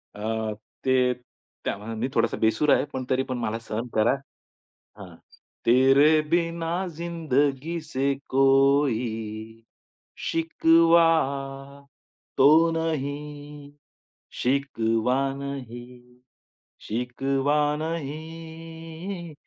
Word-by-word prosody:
अ, 110 Hz, 0 st, -2 dB, 0.3 s
ते 130 Hz, -1 st, +3 dB, 0.5 s
त्यामानाने 110 Hz, +2 st, -4 dB
मी 125 Hz, -, 0 dB
थोडासा 115 Hz, 0 st, +1 dB
बेसूर 110 Hz, +7 st, +1 dB
आहे. -, -, +2 dB
पण 130 Hz, -1 st, -3 dB
तरी 130 Hz, 0 st, +2 dB
पण 130 Hz, -2 st, -4 dB
मला 115 Hz, -1 st, -2 dB
सहन 115 Hz, +1 st, -5 dB
करा. 110 Hz, +1 st, +4 dB, 0.9 s
हां. -, -, -11 dB, 0.5 s
तेरे 135 Hz, +6 st, +5 dB
बिना 170 Hz, +1 st, 0 dB
जिंदगी 160 Hz, -2 st, -1 dB
से 140 Hz, -1 st, 0 dB, 0.2 s
कोई 120 Hz, -5 st, +1 dB, 0.7 s
शिकवा 165 Hz, +1 st, +4 dB, 1.3 s
तो 135 Hz, -, +7 dB, 0.2 s
नहीं 145 Hz, -2 st, -4 dB, 0.7 s
शिकवा 125 Hz, -3 st, +1 dB, 0.2 s
नहीं 125 Hz, -2 st, -8 dB, 0.7 s
शिकवा 135 Hz, +5 st, 0 dB, 0.2 s
नहीं 165 Hz, +2 st, -7 dB
140 Hz, 80 wpm, -25 LUFS, 120-160 Hz, 1.3 s, तो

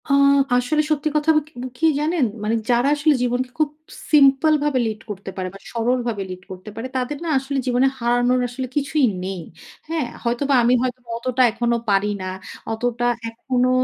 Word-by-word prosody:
আ -, -, 0 dB, 0.4 s
আসলে 250 Hz, +5 st, +2 dB
সত্যি 305 Hz, 0 st, +1 dB
কথা 300 Hz, +1 st, +1 dB
ব -, -, +5 dB
ক -, -, -16 dB, 0.3 s
কি 325 Hz, -, +1 dB
জানেন? 310 Hz, -1 st, +1 dB, 0.2 s
মানে 215 Hz, +2 st, +1 dB
যারা 240 Hz, +2 st, +3 dB
আসলে 295 Hz, +1 st, +3 dB
জীবনকে 250 Hz, +1 st, -1 dB
খুব 305 Hz, -2 st, +3 dB, 0.4 s
সিম্পল 285 Hz, +1 st, +5 dB
ভাবে 290 Hz, -3 st, +1 dB
লিড 215 Hz, 0 st, -4 dB
করতে 195 Hz, -1 st, -6 dB
পারে 185 Hz, -1 st, -2 dB
বা 195 Hz, -, -11 dB
সরলভাবে 235 Hz, -3 st, -1 dB
লিড 185 Hz, 0 st, -8 dB
করতে 185 Hz, +3 st, -9 dB
পারে, 225 Hz, +3 st, -4 dB
তাদের 260 Hz, +3 st, -2 dB
না -, -, -2 dB
আসলে 275 Hz, +1 st, -4 dB
জীবনে 250 Hz, +2 st, +3 dB
হারানোর 245 Hz, +1 st, +2 dB
আসলে 255 Hz, +1 st, -5 dB
কিছুই 290 Hz, 0 st, +2 dB, 0.2 s
নেই। 190 Hz, -2 st, -4 dB, 0.5 s
হ্যাঁ? 320 Hz, -6 st, -1 dB, 0.2 s
হয়তোবা 255 Hz, +4 st, +1 dB
আমি 240 Hz, +2 st, +4 dB
হয়তো 255 Hz, 0 st, -2 dB, 0.2 s
অতটা 255 Hz, +2 st, -1 dB
এখনো 235 Hz, +1 st, 0 dB
পারি 200 Hz, +1 st, +2 dB
না। 185 Hz, -, -3 dB, 0.4 s
অতটা 240 Hz, +1 st, -1 dB, 0.2 s
এখনো 250 Hz, +2 st, 0 dB
250 Hz, 180 wpm, -21 LUFS, 235-280 Hz, 0.5 s, ব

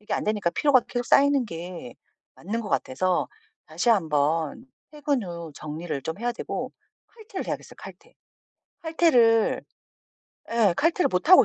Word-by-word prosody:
이게 210 Hz, -, -7 dB
안되니까 210 Hz, -5 st, 0 dB
피로가 280 Hz, +5 st, +4 dB
계속 245 Hz, -1 st, -3 dB
쌓이는 280 Hz, -2 st, +4 dB
게 170 Hz, -, -7 dB, 0.4 s
맞는 220 Hz, +6 st, -3 dB
것 210 Hz, -, -6 dB
같아서 180 Hz, +5 st, 0 dB, 0.4 s
다시 160 Hz, +8 st, -2 dB
1 200 Hz, -8 st, +3 dB
번 155 Hz, -, 0 dB, 0.3 s
퇴근 290 Hz, -4 st, -1 dB
후 170 Hz, -3 st, -7 dB
정리를 155 Hz, -1 st, -5 dB
좀 160 Hz, +6 st, -5 dB
해야 240 Hz, +2 st, -1 dB
되고 -, -, -5 dB, 0.4 s
칼퇴를 440 Hz, -4 st, -8 dB
해야겠어요 -, -, -5 dB
칼퇴. -, -, -13 dB, 0.7 s
칼퇴를 250 Hz, -10 st, +3 dB, 0.9 s
예. 220 Hz, -6 st, +3 dB
칼퇴를 340 Hz, +3 st, +2 dB
못 185 Hz, -, -1 dB
하고 370 Hz, -, +9 dB
210 Hz, 290 characters per minute, -25 LUFS, 170-270 Hz, 0.9 s, 하고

